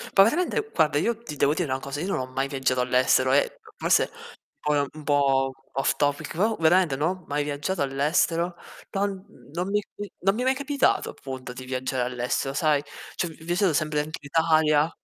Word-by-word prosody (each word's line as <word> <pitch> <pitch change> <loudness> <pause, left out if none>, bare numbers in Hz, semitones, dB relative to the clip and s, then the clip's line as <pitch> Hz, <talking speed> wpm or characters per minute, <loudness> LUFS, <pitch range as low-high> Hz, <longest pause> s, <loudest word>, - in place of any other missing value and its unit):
Poi 195 - +9
veramente 360 - 0
guarda, 150 -2 +3
io 235 +8 +1
ti 150 -10 -7
devo 145 +1 +3
dire 165 -2 -1
una 130 - 0
cosa, 140 +2 -5
io 180 - -3
non 195 - 0
ho 130 - -3
mai 135 +1 -2
viaggiato 135 -2 0
all'estero 130 +1 +3
e 145 - +2 0.2
forse - - +2 0.5
po 150 - 0 0.2
un 155 0 -11
po' 135 -2 +2 0.2
off 135 +1 +1
topic, 145 -1 -1
però 215 +5 +2
veramente 160 -2 +4
no, 175 +5 -1
mai 145 +1 -1
viaggiato 145 +5 -2
all'estero, 160 +5 +1 0.4
ton 200 +1 0 0.2
n - - -19
non 180 +3 -2
mi 205 +1 +2 0.2
i 205 -1 -6
non 195 +2 +2
mi 240 - -2
è - - -1
mai 260 - +3
capitato 280 +1 +1
appunto 130 -2 -8
di 130 +1 -9
viaggiare 130 0 -2
all'estero 125 +2 -2
sai? 150 -1 +2 0.3
Cioè, 175 - -1
vi 160 0 -13
viaggiato 175 +1 +2
sempre 150 0 +1
anche 155 +2 -4
in - - -11
Italia. 155 -1 +3
150 Hz, 200 wpm, -25 LUFS, 135-180 Hz, 0.5 s, Poi